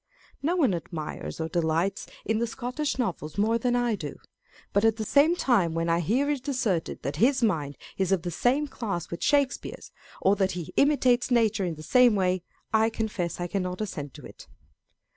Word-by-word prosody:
No 330 +5 +1
one 275 - +3
admires 165 -2 -5
or 160 - -1
delights 165 +3 0 0.2
in 220 0 +1
the 235 - 0
Scotch 255 +5 -3
Novels 170 - -3
more 225 +3 +2
than 245 +1 +1
I 245 -1 +1
do; 155 -9 -5 0.6
but 200 - +3
at 225 -1 +4
the 220 - -3
same 290 +9 +4
time 200 - +2
when 165 0 0
I 165 0 +3
hear 235 - +1
it 275 -2 -4
asserted 220 - -1
that 140 +2 -3
his 255 - +3
mind 150 -10 0 0.2
is 190 -1 +1
of 190 -4 +2
the 175 - -3
same 265 - +1
class 205 - -4
with 170 - -5
Shakespeare's, 285 -2 0 0.3
or 195 +2 +3
that 190 -1 +1
he 170 -3 -6
imitates 260 -4 +3
nature 225 -5 +2
in 170 -2 -3
the 155 - -10
same 245 - +5
way, 185 -2 +1 0.3
I 220 0 +4
confess 210 -7 -3
I 175 - -1
cannot 180 0 -3
assent 150 -10 -5
to - - -11
it. - - -13
210 Hz, 195 wpm, -27 LUFS, 170-245 Hz, 0.6 s, same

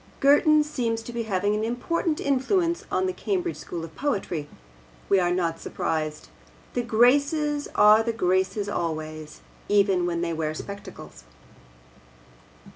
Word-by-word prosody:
Girton 300 +2 +5
seems 235 -6 -2
to 240 - -8
be 235 -1 -3
having 200 +1 +1
an 210 +1 -1
important 300 +7 -1
influence 335 +6 0
on 375 - +1
the 370 - -1
Cambridge 360 -2 -2
school 170 -2 -6
of 160 - -13
poetry. 195 - -2 0.6
We 195 - +5
are 175 -1 +2
not 170 -2 -1
surprised. 155 - -3 0.4
The 245 - 0
Graces 285 +6 +2
are 210 +1 +7
the 230 +1 -1
Graces 190 -1 0
always, 155 -4 -4 0.3
even 195 -3 +3
when 170 -1 -2
they 170 -1 -1
wear 155 -1 -2
spectacles. 200 - -9
210 Hz, 135 wpm, -25 LUFS, 175-285 Hz, 0.6 s, are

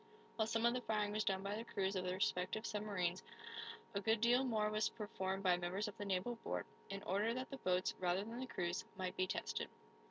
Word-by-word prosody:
While 220 -1 +2
some 225 +1 +2
of 235 - +5
the 250 - 0
firing 210 -3 +1
was 215 +1 +1
done 190 0 +1
by 200 +1 -1
the 225 - -3
crews 195 -4 0
of 185 -1 0
the 180 - +1
respective 185 +3 +1
submarines, 195 -4 0 0.7
a 200 - 0
good 220 +1 +3
deal 240 +3 +5
more 215 -4 +2
was 215 0 +2
performed 195 -3 -2
by 180 -2 +5
members 180 +4 -1
of 210 - -5
the 205 - -2
naval 200 +5 0
board, - - -2 0.2
in 195 0 -4
order 210 +5 +2
that 255 +2 -3
the 275 - -3
boats, 185 -5 +2
rather 180 +1 +2
than 230 +3 -5
the 260 - -3
crews, 175 -5 -1
might 185 -1 -2
be 185 - +2
tested. - - -2
205 Hz, 225 wpm, -40 LUFS, 185-225 Hz, 0.7 s, of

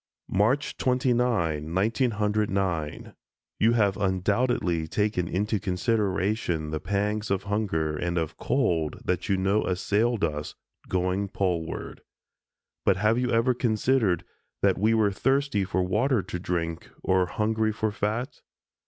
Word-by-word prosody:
March 115 +9 +1
29, 120 - +1
1909: 105 - 0 0.5
You 115 +2 +4
have 105 -5 +2
undoubtedly 95 -3 0
taken 105 -1 0
into 105 +4 0
consideration 95 -4 0
the 80 - -2
pangs 105 +3 -1
of 100 0 0
hunger 100 -7 -1
and 85 +3 -2
of 80 -2 -2
cold 85 - 0
that 90 -1 -1
you 95 - +3
know 95 +3 +2
assailed 105 +5 +1
us, 75 -2 -2 0.3
going 95 +2 0
Poleward; 90 -5 -3 0.8
but 95 - +3
have 105 +4 +2
you 125 -1 0
ever 115 +2 +3
considered 115 - +1 0.4
that - - +3
we 110 +3 +3
were 105 -2 +3
thirsty 135 0 +1
for 95 0 0
water 105 +5 +1
to 90 0 -5
drink 85 -2 -3
or 95 -1 +2
hungry 110 +2 0
for 110 0 -1
fat? 110 +4 -3
100 Hz, 125 wpm, -26 LUFS, 90-110 Hz, 0.8 s, You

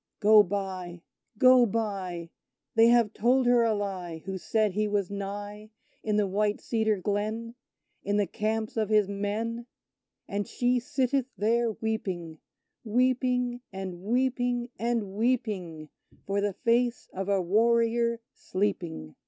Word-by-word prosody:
Go 215 0 +7
by 185 -3 -4 0.3
go 255 +1 +7
by! 190 -6 -3 0.4
They 225 0 +6
have 235 -3 +4
told 250 +3 +2
her 245 0 +5
a 225 -2 +2
lie, 185 -5 -4
Who 190 -1 -4
said 215 +2 +1
he 210 +3 0
was 205 -2 -1
nigh, 205 +1 -6 0.3
In 215 -1 -1
the 210 - +3
white 205 +2 0
cedar 220 -2 0
glen 215 +4 -2 0.5
In 205 +1 0
the 205 - +2
camps 220 +4 -2
of 215 -2 0
his 210 -2 +4
men: 215 +4 -3 0.6
And 205 0 -3
she 245 0 +1
sitteth 265 0 0
there 230 +3 +1
weeping 185 -8 -4 0.4
Weeping, 250 +1 +1
and 185 -2 -6
weeping, 245 +2 0
and 230 -4 -1
weeping, 205 -9 -1 0.4
For 200 +1 0
the 205 -1 0
face 240 +4 +1
of 195 +1 -4
a 200 -1 +3
warrior 230 +4 +2
sleeping! 175 - -3
215 Hz, 135 wpm, -28 LUFS, 195-235 Hz, 0.6 s, Go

